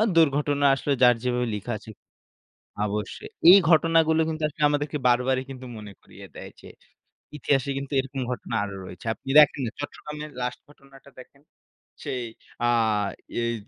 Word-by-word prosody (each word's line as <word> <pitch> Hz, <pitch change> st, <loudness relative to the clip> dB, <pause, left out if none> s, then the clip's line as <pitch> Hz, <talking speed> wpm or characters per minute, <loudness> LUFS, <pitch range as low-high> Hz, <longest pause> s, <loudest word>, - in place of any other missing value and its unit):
দুর্ঘটনা 145 Hz, -2 st, +2 dB
আসলো 145 Hz, -, -3 dB
যার 125 Hz, -1 st, +6 dB
যেভাবে 125 Hz, -1 st, 0 dB
লিখা 105 Hz, +4 st, -5 dB
আছে 110 Hz, -, -14 dB, 1.0 s
অবশ্যই। 105 Hz, +1 st, -5 dB, 0.2 s
এই 200 Hz, -, +10 dB
ঘটনাগুলো 160 Hz, -1 st, +4 dB
কিন্তু 155 Hz, -1 st, -4 dB
আসলে 150 Hz, 0 st, -5 dB
আমাদেরকে 145 Hz, 0 st, -1 dB
বারবারই 130 Hz, +2 st, +2 dB, 0.3 s
মনে 105 Hz, -2 st, -10 dB
করিয়ে -, -, -14 dB
দেয় -, -, -9 dB
যে -, -, -14 dB, 0.7 s
ইতিহাসে 140 Hz, -1 st, 0 dB
কিন্তু 140 Hz, +1 st, -7 dB
এরকম 135 Hz, 0 st, -6 dB
ঘটনা 120 Hz, -2 st, -5 dB
আরো 100 Hz, -1 st, -7 dB
রয়েছে। 90 Hz, +5 st, -11 dB
আপনি 135 Hz, -, -15 dB
দেখেন 150 Hz, -2 st, +6 dB
না 110 Hz, -, -3 dB
চট্টগ্রামের 150 Hz, +1 st, -7 dB
লাস্ট 125 Hz, 0 st, -4 dB
ঘটনাটা 140 Hz, -1 st, -19 dB
দেখেন, 140 Hz, +2 st, -15 dB, 0.6 s
সেই 125 Hz, -1 st, -4 dB, 0.4 s
আ -, -, +2 dB, 0.8 s
এই 115 Hz, 0 st, -1 dB
135 Hz, 145 wpm, -25 LUFS, 125-150 Hz, 1.0 s, এই